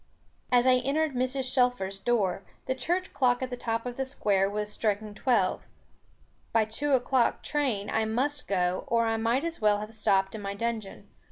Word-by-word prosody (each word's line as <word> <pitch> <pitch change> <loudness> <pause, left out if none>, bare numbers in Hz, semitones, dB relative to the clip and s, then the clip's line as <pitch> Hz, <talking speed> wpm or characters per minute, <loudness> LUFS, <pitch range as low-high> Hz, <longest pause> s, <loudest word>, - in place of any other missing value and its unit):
As 245 0 +4
I 255 -1 +6
entered 285 +4 0
Mrs. 255 +1 -1
Shelfer's 245 -7 +1
door, 200 -6 0 0.2
the 260 - 0
church 355 +8 -2
clock 250 -1 +2
at 255 - -4
the - - -2
top 230 -1 -3
of 245 -1 -5
the 270 - 0
Square 200 -7 +1
was 210 0 -3
striking 210 -1 -1
twelve. 245 +4 +1 0.9
By 225 -1 +3
the 220 - -19
two 285 +5 0
o'clock 255 -1 +2
train 255 -9 -1
I 220 0 0
must 270 +7 -1
go, 180 -2 0
or 230 0 +2
I 225 0 0
might 230 +5 +1
as 335 -5 -4
well 210 -1 +4
have 215 +1 -7
stopped 195 -3 +1
in 220 - -6
my 200 0 -4
dungeon. 225 -2 -4
235 Hz, 190 wpm, -28 LUFS, 210-260 Hz, 0.9 s, I